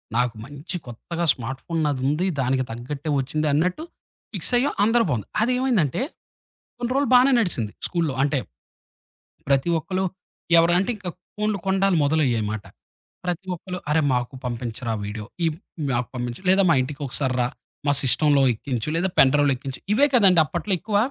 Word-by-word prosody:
నాకు 120 -1 +1
మంచి 145 +7 -7
కొత్తగా 170 +9 -4
స్మార్ట్ 130 +2 -6
ఫోను 165 -1 -1
నాదుంది. 145 +4 0
దానికి 130 0 +1
తగ్గట్టే 135 +6 -5
ఒచ్చిందన్నట్టు 155 - 0 0.5
ఫిక్సయ్యాం 250 +3 +2
అందరూ 230 +2 +4
బావుంది. 115 -7 -2
అదేమైందంటే 245 - +1 0.8
కొన్ని 240 0 -3
రోజులు 280 -1 +1
బానే 255 +2 +6
నడిసింది 120 - -1 0.2
స్కూలు‌లో 165 -6 -1
అంటే, 145 -1 +1 1.1
ప్రతి 140 +4 +2
ఒక్కళు 185 +4 -2 0.5
ఎవరు 170 +1 +4
అంటే 190 +5 0
ఇంక 195 -3 -7 0.3
ఫోనులు 210 -1 0
కొండాలు 195 -1 +2
మొదలయ్యాయిమాట. 120 -9 0 0.6
ప్రతి 180 +1 -3
ఒక్కళ్ళు 180 +1 -6
అరే 155 +1 +3
మాకు 125 +2 -1
పంపించరా 120 -1 -4
వీడియో. 105 +1 -5 0.2
ఈ - - +3 0.5
మాకు 120 0 -1
పంపించు 120 +3 -5
లేదా 195 +1 +5
మా 165 - +6
ఇంటికొకసారిరా 130 -2 -1 0.4
మా 145 - +4
సిస్టమ్‌లో 145 +1 +4
ఎక్కించు 125 +2 -4
లేదా 180 +2 0
పెన్‌డ్రైవ్‌లో 140 +1 +5
ఎక్కించు. 135 +1 -7
ఇవే 285 +6 +5
కదండి! 190 -7 +6
అప్పట్లో 175 +5 -3
ఎక్కువ. 210 -1 -1
150 Hz, 140 wpm, -23 LUFS, 130-190 Hz, 1.1 s, బానే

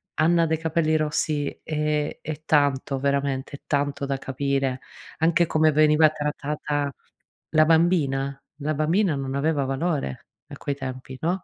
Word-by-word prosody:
Anna 165 +1 +3
dai 160 0 0
capelli 160 0 +1
rossi, 150 -1 -1
ehm, 150 -1 -1
è 155 0 -6
tanto, 140 -2 +2
veramente 140 0 -1
tanto 145 -1 -1
da 135 0 -1
capire. 135 -1 -1 0.4
Anche 165 +1 +3
come 155 -1 +3
veniva 155 +1 +5
trattata 150 -1 -2 0.6
la 155 0 +4
bambina, 150 -5 +2 0.2
la 155 +1 -2
bambina 165 +4 +2
non 135 -1 -3
aveva 145 -1 +1
valore 135 - -2 0.2
a - - -9
quei 140 - -3
tempi, 130 -1 -7
no 175 +3 -1
150 Hz, 135 wpm, -24 LUFS, 140-155 Hz, 0.6 s, veniva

